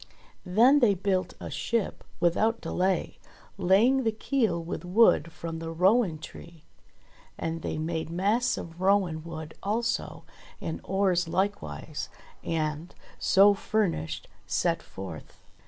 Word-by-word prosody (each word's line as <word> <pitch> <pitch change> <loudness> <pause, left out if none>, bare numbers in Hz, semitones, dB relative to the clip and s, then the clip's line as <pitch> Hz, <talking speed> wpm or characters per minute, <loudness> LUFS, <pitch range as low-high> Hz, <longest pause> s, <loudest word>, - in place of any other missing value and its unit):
Then 240 +10 +5
they 220 -7 +4
built 185 -1 -1
a - - -7
ship 230 -4 -2 0.2
without 220 +7 +2
delay, 185 -1 -1 0.4
laying 215 +9 +4
the 225 - +2
keel 220 -5 0
with 170 +2 -5
wood 180 -2 +4
from 165 0 -6
the 165 0 -5
rowan 185 +2 +3
tree. 165 +1 -12 0.7
And 165 0 -3
they - - -3
made 160 +1 -3
masts 210 +8 +1
of 165 +1 -8
rowan 190 -5 +2
wood 160 -2 -7
also, 230 +4 -2 0.4
and 160 - -5
oars 185 -3 +1
likewise; 190 -4 -3 0.3
and, 155 0 -2 0.2
so 200 +1 +6
furnished, 200 - -1 0.2
set - - 0
forth. 95 -4 -10
185 Hz, 120 wpm, -28 LUFS, 165-210 Hz, 0.7 s, so